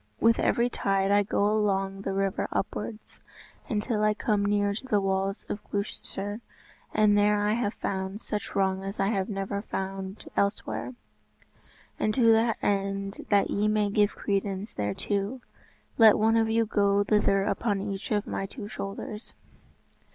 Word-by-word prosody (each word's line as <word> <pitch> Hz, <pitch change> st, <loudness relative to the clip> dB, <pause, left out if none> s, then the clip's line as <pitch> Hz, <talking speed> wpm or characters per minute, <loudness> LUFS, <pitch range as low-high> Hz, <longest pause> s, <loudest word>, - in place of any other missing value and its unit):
With 230 Hz, 0 st, +4 dB
every 235 Hz, +1 st, +2 dB
tide 195 Hz, -4 st, 0 dB
I 205 Hz, 0 st, +5 dB
go 200 Hz, 0 st, 0 dB
along 195 Hz, -2 st, +1 dB
the 195 Hz, -, -3 dB
river 195 Hz, 0 st, 0 dB
upwards, 215 Hz, +2 st, -4 dB, 0.5 s
until 215 Hz, -1 st, 0 dB
I 215 Hz, 0 st, +3 dB
come 210 Hz, -2 st, +1 dB
near 205 Hz, 0 st, +2 dB
to 250 Hz, +6 st, -7 dB
the 210 Hz, -5 st, +3 dB
walls 195 Hz, 0 st, -1 dB
of 205 Hz, -, -5 dB
Gloucester, 205 Hz, +1 st, -4 dB, 0.5 s
and 210 Hz, -1 st, +4 dB
there 205 Hz, 0 st, +4 dB
have 215 Hz, -1 st, 0 dB
I -, -, -36 dB
found 190 Hz, +1 st, -2 dB
such 210 Hz, -2 st, -5 dB
wrong 190 Hz, -1 st, +1 dB
as 195 Hz, +2 st, -6 dB
I 195 Hz, +2 st, +2 dB
never 200 Hz, 0 st, -3 dB
found 195 Hz, -1 st, -5 dB
elsewhere; 125 Hz, -, -1 dB, 1.0 s
and 215 Hz, -, +1 dB
to 255 Hz, -, +2 dB
the 225 Hz, 0 st, +3 dB
end 195 Hz, 0 st, -1 dB
that 200 Hz, -1 st, +3 dB
ye 210 Hz, +1 st, +1 dB
may 210 Hz, -1 st, +1 dB
give 205 Hz, 0 st, +2 dB
credence 200 Hz, 0 st, -2 dB
thereto, 200 Hz, -, -2 dB, 0.6 s
let 220 Hz, -2 st, +8 dB
one 220 Hz, +1 st, +3 dB
of 225 Hz, -1 st, +3 dB
you 225 Hz, 0 st, +2 dB
go 200 Hz, -1 st, +2 dB
thither 200 Hz, -1 st, +2 dB
upon 205 Hz, 0 st, 0 dB
each 195 Hz, 0 st, -4 dB
of 210 Hz, -1 st, 0 dB
my 195 Hz, -, -3 dB
two 205 Hz, 0 st, -8 dB
shoulders." 210 Hz, +1 st, -5 dB
205 Hz, 155 wpm, -27 LUFS, 195-215 Hz, 1.0 s, let